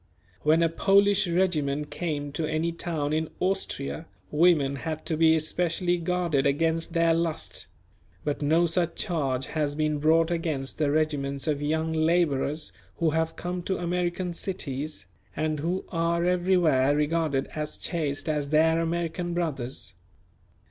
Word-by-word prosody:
When 160 +2 +4
a - - +5
Polish 200 +3 +3
regiment 150 -5 0
came 145 -4 -3
to 155 +2 -2
any 160 +2 0
town 160 -3 -2
in 155 0 0
Austria, 180 -4 -2 0.2
women 150 -4 +3
had 155 +2 -5
to 160 - -1
be 160 0 +5
especially 175 +2 0
guarded 170 -5 +1
against 165 +4 0
their 165 -1 +3
lust; 165 -1 -2 0.6
but 145 0 -2
no 160 +4 +3
such 170 0 0
charge 140 -9 -1
has 150 -2 0
been 155 -1 0
brought 160 +2 +3
against 155 -6 -2
the 150 -2 +2
regiments 145 -2 0
of 150 -2 0
young 160 +2 0
labourers 155 -2 +1 0.2
who 165 -2 +1
have 160 +1 0
come 180 0 -4
to 190 +2 -2
American 175 0 -1
cities, 155 - -4 0.3
and 155 -1 -1
who 175 +5 -2
are 170 0 0
everywhere 175 -7 +3
regarded 150 -2 +1
as 150 -1 -3
chaste 150 -3 -2
as 150 -2 -1
their 160 +2 +4
American 170 +1 -2
brothers. 135 - -3
160 Hz, 140 wpm, -27 LUFS, 150-170 Hz, 0.6 s, a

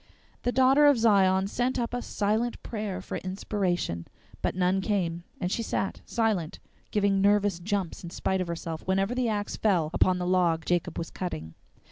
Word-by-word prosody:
The 245 - 0
Daughter 265 +3 +5
of 285 -3 +6
Zion 195 -4 +4
sent 245 +6 -1
up 235 -1 -2
a 245 - -1
silent 220 +3 -1
prayer 210 -4 -4
for - - -4
inspiration, 185 - -2 0.3
but - - -1
none 185 +1 +2
came, 175 -4 -1
and 180 - -2
she 230 - 0
sat 195 -3 -2
silent, 215 -8 0 0.3
giving 200 -2 +2
nervous 205 -2 +3
jumps 195 -1 -2
in 170 - -6
spite 190 +2 -1
of 180 - -2
herself 165 -1 -4
whenever 195 +4 +1
the 250 -2 0
axe 205 -1 -2
fell 175 -8 +2
upon 185 -1 +3
the 180 - -2
log 175 -3 +2
Jacob 175 -1 0
was 165 - -4
cutting. 80 - -5
195 Hz, 175 wpm, -28 LUFS, 175-215 Hz, 0.3 s, of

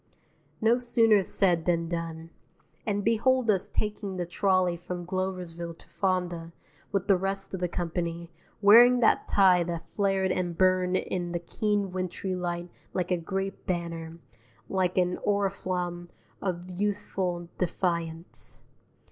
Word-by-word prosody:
No 230 +3 +4
sooner 225 -4 +4
said 175 -3 +1
than 170 -1 +1
done; 165 -1 -5 0.6
and 205 -1 0
behold 230 +2 +3
us 190 -3 -1
taking 210 -2 -3
the 175 - -1
trolley 185 0 +2
from 175 +1 -6
Gloversville 180 -2 -4
to - - -18
Fonda, 180 -3 -1 0.4
with 195 -2 -1
the 200 - +6
rest 195 +1 -2
of 190 - -3
the 180 - 0
company, 170 -1 -3 0.3
wearing 240 +4 +8
that 225 - +3
tie 185 -3 +5
that 170 -1 -4
flared 195 -2 +1
and 175 -2 -1
burned 185 0 +3
in 175 -2 -3
the 175 - -1
keen 205 +3 -1
wintry 185 +1 -3
light 175 -1 -3 0.2
like 180 -1 -1
a - - +4
great 195 +4 -4
banner, 165 -2 -3 0.5
like 185 -1 0
an 180 0 +2
oriflamme 185 -3 -1 0.3
of 180 -1 -3
youthful 185 -3 -2
defiance. 170 -2 -3
185 Hz, 135 wpm, -28 LUFS, 175-195 Hz, 0.6 s, wearing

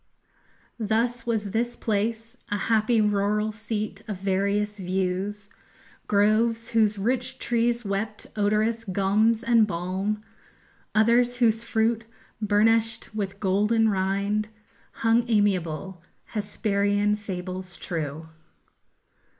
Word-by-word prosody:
_Thus 230 +3 0
was 215 -4 -1
this 235 +3 -1
place 225 +2 -2
A 205 - 0
happy 225 +1 +2
rural 210 +1 +1
seat 215 0 -4
of 210 -3 -4
various 200 +2 0
views, 190 +2 -2 0.6
Groves 225 +3 +2
whose 215 -2 +3
rich 250 +5 -1
trees 235 -1 0
wept 205 +2 -3
odorous 215 +2 +1
gums 210 +3 +2
and 230 -2 +4
balm, 190 +3 -2 0.8
Others, 240 +3 +4
whose 225 -2 +2
fruit, 230 0 0 0.4
burnish'd 220 +2 +2
with 200 -2 -4
golden 210 +3 +2
rind, 200 +2 0 0.5
_Hung 230 +1 +4
amiable, 190 -5 0 0.3
Hesperian 205 -1 +1
fables 185 -3 -6
true. 160 -1 -4
210 Hz, 100 wpm, -26 LUFS, 200-225 Hz, 0.8 s, and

